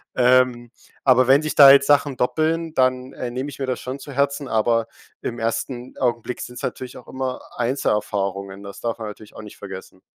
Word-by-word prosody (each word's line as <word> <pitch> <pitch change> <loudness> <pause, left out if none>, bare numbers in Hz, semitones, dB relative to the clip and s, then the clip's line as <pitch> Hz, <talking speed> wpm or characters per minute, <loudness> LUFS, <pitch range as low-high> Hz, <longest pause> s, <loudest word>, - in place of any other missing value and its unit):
Ähm, 125 -1 +3 0.3
aber 130 -2 +5
wenn 135 +3 +6
sich 155 -2 -3
da 140 -2 +10
jetzt 140 0 +6
Sachen 145 -2 +3
doppeln, 160 +5 0
dann, 130 -1 +1
äh, 125 - -5
nehme 130 +4 -4
ich 140 - -11
mir 135 - -1
das 130 -1 -3
schon 130 +2 -6
zu 140 0 -9
Herzen, 140 +1 0
aber 115 0 +1 0.3
im 120 -1 -4
ersten 120 +2 -3
Augenblick 120 -1 -1
sind's 125 - -7
natürlich 130 -1 -5
auch - - -12
immer 130 -1 -4 0.2
Einzelerfahrungen, 100 -5 -2
das 100 -1 -9
darf 115 -1 -3
man 110 - -5
natürlich 105 0 -13
auch - - -8
nicht 105 -1 -12
vergessen. 95 -1 -10
125 Hz, 195 wpm, -22 LUFS, 115-135 Hz, 0.3 s, da